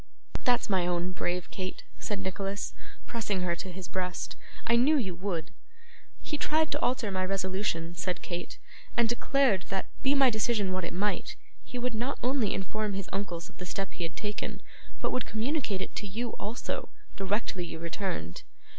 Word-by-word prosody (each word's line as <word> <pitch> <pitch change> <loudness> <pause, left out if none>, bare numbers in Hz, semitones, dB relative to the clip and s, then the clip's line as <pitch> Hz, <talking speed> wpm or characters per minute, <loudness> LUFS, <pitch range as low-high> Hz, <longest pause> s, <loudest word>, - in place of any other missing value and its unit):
'That's 245 -1 +4
my 185 -3 +3
own 175 +1 +1
brave 180 -1 -1
Kate!' 185 -1 -3 0.2
said 205 - -1
Nicholas, 195 +1 -2 0.3
pressing 210 -5 0
her 175 -1 +2
to 185 +2 -5
his 185 0 -6
breast. 180 -2 -2 0.3
'I 235 - +6
knew 290 +6 +6
you 195 -9 +1
would.' 175 -3 -2 0.7
'He 300 - -2
tried 315 0 +3
to - - +2
alter 245 -5 +2
my 185 -1 +1
resolution,' 185 -3 0
said 180 +1 -1
Kate, 175 -1 -3 0.4
'and 235 -1 +6
declared 240 -3 +4
that, 195 -1 0 0.2
be 275 +2 +5
my 270 -2 +7
decision 215 -3 +2
what 185 -1 0
it - - -3
might, 205 +3 0 0.3
he 250 - -6
would 245 0 0
not 245 +5 0
only 250 -5 +3
inform 210 +2 -1
his 195 -1 -3
uncles 175 -4 -2
of - - -17
the 180 - -4
step 195 +2 -2
he - - -8
had 165 - -2
taken, 210 -1 -3 0.4
but - - +1
would 255 - 0
communicate 225 -4 0
it - - -7
to 205 - -2
you 230 +5 -1
also, 215 +4 -2 0.3
directly 195 -1 0
you 170 - -4
returned. 165 - -2
195 Hz, 180 wpm, -31 LUFS, 180-235 Hz, 0.7 s, my